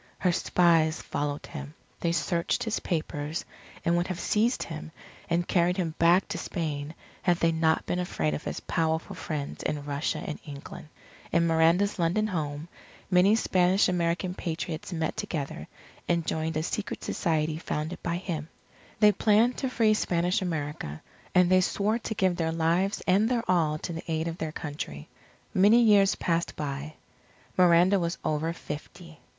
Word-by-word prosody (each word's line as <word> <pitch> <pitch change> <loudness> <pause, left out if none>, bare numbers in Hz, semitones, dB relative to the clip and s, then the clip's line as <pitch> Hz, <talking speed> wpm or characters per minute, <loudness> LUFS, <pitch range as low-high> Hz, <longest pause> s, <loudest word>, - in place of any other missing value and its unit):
Her 180 - +2
spies 165 -3 +3
followed 145 0 -3
him. 150 -1 -8 0.2
They 170 - 0
searched 170 +1 0
his 220 -1 -1
papers; 155 -2 -3 0.4
and 170 - +3
would 175 +1 +1
have 185 -2 -4
seized 230 +4 +1
him 160 -1 -7 0.4
and 170 +1 +1
carried 180 +1 +2
him 170 -4 -1
back 170 +3 +5
to - - -3
Spain, 155 -3 -4 0.3
had 175 -2 +2
they 165 -1 +2
not 160 0 +1
been 180 - -1
afraid 80 - -1
of 75 - -4
his - - -4
powerful 160 0 -1
friends 145 -3 -4
in 145 -1 -3
Russia 145 +1 -1
and 155 - -5
England. 145 0 -9 0.4
In 170 -1 +3
Miranda's 170 +5 +3
London 175 +6 +2
home, 155 -6 -3 0.4
many 185 +4 +5
Spanish 185 -3 +3
American 180 0 0
Patriots 165 -1 -4
met 160 -2 -2
together, 140 - -4 0.4
and 170 -2 +1
joined 160 0 -1
a 155 - 0
secret 210 +4 -4
society 155 -2 0
founded 155 +1 -4
by 170 0 -1
him. 165 -4 -4 0.5
They 210 -1 +7
planned 220 +4 +3
to 265 - -1
free 225 -4 +3
Spanish 180 -3 +1
America; 150 - -4 0.3
and 180 -1 +6
they 185 +1 +5
swore 210 +5 0
to 220 - -4
give 185 -3 +1
their 165 -2 0
lives 170 +5 +1
and 200 +4 +3
their 240 -2 +1
all 160 -4 +2
to 170 - -5
the 165 +2 -6
aid 160 +1 0
of 165 +1 -5
their 160 -1 -3
Country. 145 - -6 0.4
Many 205 +5 +6
years 205 -4 +5
passed 170 0 -1
by. 145 +1 -5 0.6
Miranda 180 +2 +5
was 170 -1 -2
over 155 +2 0
fifty. 165 +1 -9
170 Hz, 165 wpm, -28 LUFS, 155-185 Hz, 0.6 s, They